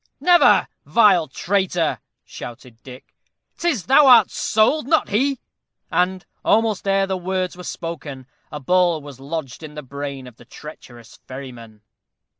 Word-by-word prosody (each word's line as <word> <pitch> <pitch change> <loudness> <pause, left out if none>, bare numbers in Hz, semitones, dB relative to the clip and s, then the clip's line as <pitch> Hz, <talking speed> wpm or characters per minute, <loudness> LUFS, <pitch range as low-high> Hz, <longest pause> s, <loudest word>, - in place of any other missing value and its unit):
"Never! 350 +4 +5 0.2
vile 200 -8 +3
traitor," 180 -4 -1 0.3
shouted 120 -1 -11
Dick; 130 -1 -14 0.4
"'tis 320 - -1
thou 275 +2 +5
art 250 -2 +7
sold, 240 +6 +1
not 320 +1 +2
he;" 265 +7 0 0.5
and, 185 +1 0 0.2
almost 220 -3 +1
ere 195 0 +2
the 190 -1 -3
words 185 0 -3
were 180 - -10
spoken, 145 -6 -7 0.3
a 150 - -6
ball 175 +2 +2
was 140 -3 -11
lodged 140 -1 -6
in 150 -1 -10
the 150 - -7
brain 140 0 -7
of 125 -2 -14
the 120 - -17
treacherous 120 -5 -13
ferryman. 120 -5 -10
170 Hz, 140 wpm, -21 LUFS, 135-200 Hz, 0.5 s, art